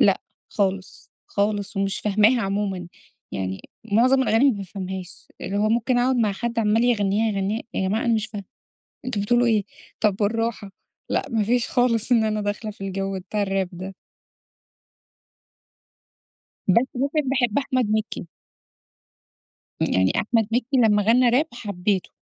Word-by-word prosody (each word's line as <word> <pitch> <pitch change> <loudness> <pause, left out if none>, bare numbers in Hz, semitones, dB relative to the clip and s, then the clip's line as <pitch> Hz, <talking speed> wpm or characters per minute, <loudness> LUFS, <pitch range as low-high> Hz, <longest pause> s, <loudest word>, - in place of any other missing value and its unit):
لأ - - +4 0.3
خالص، 195 -2 -2 0.2
خالص، 205 0 -1
ومش 195 0 0
فاهماها 215 +4 +3
عمومًا. 195 -2 -2 0.4
يعني 95 0 -3 0.3
مُعظم 255 +4 +4
الأغاني 255 +4 +4
ما 220 - -3
بافهمهاش. 190 -1 -7
اللي 200 - -3
هو 210 +1 +2
ممكن 240 +2 +1
أقعد 255 +1 +2
مع 215 -4 +2
حد 235 +3 -3
عَمّال 220 +2 +3
يغنّيها، 215 -2 +2
يغنّيها، 200 +3 -1
يا 190 - 0
جماعة 220 +5 0
أنا 235 - +3
مش 220 -1 0
فاهمة، 205 -3 -7 0.6
أنتم 230 -6 -2
بتقولوا 240 +4 +2
إيه؟ 215 -3 +2 0.4
طب 210 -3 +2
بالراحة، 220 -1 -1 0.4
لأ - - 0
ما 225 -2 +1
فيش 240 +2 +1
خالص 245 -1 +1
إن 225 -2 +4
أنا 215 -1 0
داخلة 210 +1 -3
في 205 - -15
الجَو 195 0 -3
بتاع 205 +3 -3
الراب 195 -2 0
ده. 185 +2 -7 2.7
بس 230 +7 +4
ممكن 280 +2 0
باحب 245 -3 +1
أحمد 255 -5 0
مِكّي. 215 -5 -2 1.5
يعني 95 0 +2
أحمد 225 -1 +1
مِكّي 250 +3 +1
لمّا 215 -4 +4
غَنّى 240 +4 +4
راب، 260 +7 +3
حبّيته. 200 -4 -2
215 Hz, 145 wpm, -23 LUFS, 195-235 Hz, 2.7 s, لأ